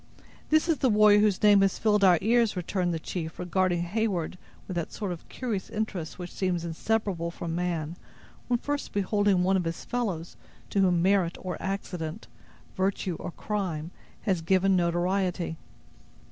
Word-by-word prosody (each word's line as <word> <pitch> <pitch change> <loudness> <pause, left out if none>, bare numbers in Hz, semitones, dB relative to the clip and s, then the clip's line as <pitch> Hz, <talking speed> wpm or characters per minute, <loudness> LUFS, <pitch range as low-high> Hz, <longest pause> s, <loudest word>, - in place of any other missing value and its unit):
"This 310 +2 +4
is 325 -4 +1
the 260 - +3
warrior 210 -1 +6
whose 210 -2 +2
name 205 -1 +7
has 195 -1 +2
filled 210 -2 +2
our 180 -3 +7
ears!" 230 -2 +3
returned 180 0 -1
the 165 - -1
chief, 160 0 -5
regarding 180 -1 +1
Heyward 185 -3 -1 0.3
with 185 - -4
that 170 -2 -3
sort 205 -4 -4
of 170 - -8
curious 225 -7 -3
interest 200 -7 -3
which 180 -1 -7
seems 180 -3 -1
inseparable 175 0 -1
from 170 -1 -5
man, 170 -2 -2 0.5
when 245 - +2
first 290 +4 -3
beholding 200 -2 +2
one 190 +1 +3
of 180 - 0
his 165 0 -4
fellows 195 -9 -3 0.3
to 200 - +1
whom 180 -3 +3
merit 190 -3 +2
or 180 -2 -4
accident, 185 -1 -4 0.5
virtue 190 -2 0
or - - -5
crime, 175 -4 -3 0.3
has 190 -6 +1
given 190 +3 +3
notoriety. 175 0 0
185 Hz, 160 wpm, -28 LUFS, 175-205 Hz, 0.5 s, name